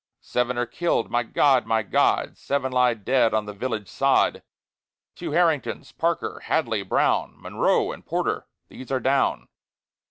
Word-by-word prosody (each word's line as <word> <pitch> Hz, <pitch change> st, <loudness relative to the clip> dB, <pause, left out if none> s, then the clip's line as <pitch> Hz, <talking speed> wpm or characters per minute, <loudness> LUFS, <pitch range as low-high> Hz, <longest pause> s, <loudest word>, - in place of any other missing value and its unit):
Seven 125 Hz, 0 st, -1 dB
are 120 Hz, -, +1 dB
killed. 170 Hz, -2 st, -1 dB
My 120 Hz, -, +2 dB
God! 130 Hz, +2 st, +2 dB
my 110 Hz, -1 st, +1 dB
God! -, -, +1 dB
Seven 135 Hz, -2 st, -2 dB
lie 125 Hz, -1 st, +3 dB
dead 115 Hz, +2 st, +1 dB
on 110 Hz, -1 st, 0 dB
the 105 Hz, -, -7 dB
village 110 Hz, -1 st, -4 dB
sod. -, -, +2 dB, 0.7 s
Two -, -, -6 dB
Harringtons, 165 Hz, -4 st, 0 dB
Parker, 170 Hz, 0 st, -2 dB
Hadley, 115 Hz, -10 st, 0 dB
Brown, 95 Hz, -, 0 dB
Monroe -, -, +1 dB
and -, -, -10 dB
Porter, -, -, -2 dB, 0.2 s
these 130 Hz, -, -11 dB
are 130 Hz, -, +1 dB
down. 135 Hz, +1 st, +1 dB
125 Hz, 150 wpm, -24 LUFS, 115-135 Hz, 0.7 s, lie